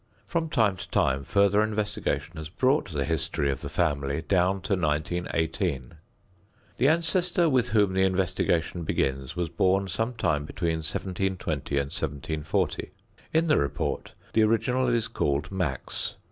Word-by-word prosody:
From 165 Hz, -2 st, -1 dB
time 110 Hz, -9 st, +2 dB
to -, -, -8 dB
time 65 Hz, +1 st, +1 dB
further 100 Hz, +6 st, +3 dB
investigation 105 Hz, -5 st, -1 dB
has 80 Hz, -1 st, -6 dB
brought 130 Hz, -, +1 dB
the 70 Hz, -3 st, -1 dB
history 75 Hz, -3 st, 0 dB
of 65 Hz, -, -4 dB
the -, -, -5 dB
family 70 Hz, +1 st, 0 dB
down 95 Hz, +4 st, +2 dB
to 100 Hz, -, -1 dB
1918. 80 Hz, -, -1 dB, 0.8 s
The 130 Hz, -, +3 dB
ancestor 170 Hz, +2 st, +2 dB
with 125 Hz, -4 st, +2 dB
whom 105 Hz, -4 st, +3 dB
the 95 Hz, -, +2 dB
investigation 90 Hz, -2 st, +1 dB
begins 65 Hz, -3 st, -1 dB
was 90 Hz, -2 st, -1 dB
born 95 Hz, +4 st, +2 dB
some 115 Hz, +6 st, -2 dB
time 75 Hz, -9 st, +1 dB
between 85 Hz, 0 st, -1 dB
1720 90 Hz, -3 st, -2 dB
and 70 Hz, 0 st, -1 dB
1740. 75 Hz, +2 st, -2 dB, 0.4 s
In 160 Hz, +1 st, +3 dB
the 150 Hz, -2 st, +4 dB
report 70 Hz, -, -2 dB, 0.2 s
the 110 Hz, -, +4 dB
original 115 Hz, +4 st, +2 dB
is 120 Hz, -2 st, +1 dB
called 75 Hz, -9 st, -1 dB
"Max." 90 Hz, -9 st, -2 dB
90 Hz, 145 wpm, -27 LUFS, 75-110 Hz, 0.8 s, the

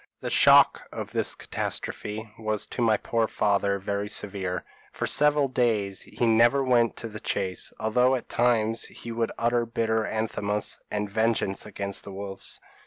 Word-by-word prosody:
The -, -, -4 dB
shock -, -, +6 dB
of -, -, -6 dB
this -, -, 0 dB
catastrophe 110 Hz, +1 st, -5 dB
was 110 Hz, -1 st, -1 dB
to -, -, -5 dB
my 110 Hz, -2 st, +4 dB
poor 115 Hz, +1 st, 0 dB
father 100 Hz, -2 st, +1 dB
very 100 Hz, +1 st, -3 dB
severe; 95 Hz, -3 st, -3 dB, 0.3 s
for -, -, -3 dB
several 150 Hz, -1 st, +4 dB
days 110 Hz, -7 st, 0 dB
he 120 Hz, -, -2 dB
never 120 Hz, +4 st, +4 dB
went 120 Hz, -3 st, +3 dB
to 115 Hz, -, -6 dB
the 105 Hz, -1 st, -8 dB
chase, 95 Hz, -3 st, -2 dB
although 125 Hz, +4 st, +3 dB
at 125 Hz, -, -5 dB
times 115 Hz, -2 st, +1 dB
he 115 Hz, -, -9 dB
would 115 Hz, 0 st, -1 dB
utter 120 Hz, +1 st, +1 dB
bitter 110 Hz, -1 st, 0 dB
anathemas 105 Hz, -1 st, -2 dB
and 105 Hz, 0 st, -2 dB
vengeance 110 Hz, -1 st, 0 dB
against 100 Hz, -1 st, -4 dB
the 100 Hz, -, -9 dB
wolves. 95 Hz, 0 st, -6 dB
110 Hz, 160 wpm, -26 LUFS, 100-115 Hz, 0.3 s, shock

